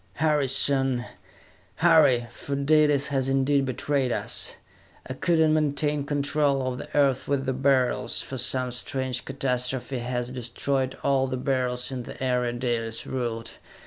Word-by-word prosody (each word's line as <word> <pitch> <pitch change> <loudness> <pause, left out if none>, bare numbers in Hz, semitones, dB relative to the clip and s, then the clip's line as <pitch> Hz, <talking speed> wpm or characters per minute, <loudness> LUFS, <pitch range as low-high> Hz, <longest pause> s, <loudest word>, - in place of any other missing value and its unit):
"Hurry, 150 -2 +1
son! 135 -2 +3 0.7
Hurry! 155 -8 +4
For 140 +3 -5
Dalis 145 0 +3
has 135 -2 0
indeed 135 +1 +2
betrayed 130 0 -1
us! - - -2 0.5
I 130 - -4
could 170 +5 0
not 160 -1 +4
maintain 150 -1 0
control 145 -2 0
of 125 -1 -3
the - - -7
Earth 135 -3 +2
with 140 -1 0
the 130 - 0
Beryls, 130 -1 +1
for 130 - -4
some 130 0 +1
strange 130 0 -3
catastrophe 130 -1 -2
has 125 0 -3
destroyed 130 +2 -2
all 135 -1 +2
the 130 0 -3
Beryls 125 -1 -1
in 130 -1 -4
the 120 - -10
area 125 -2 0
Dalis 120 -2 -2
ruled! 115 -3 -4
135 Hz, 145 wpm, -25 LUFS, 125-140 Hz, 0.7 s, Hurry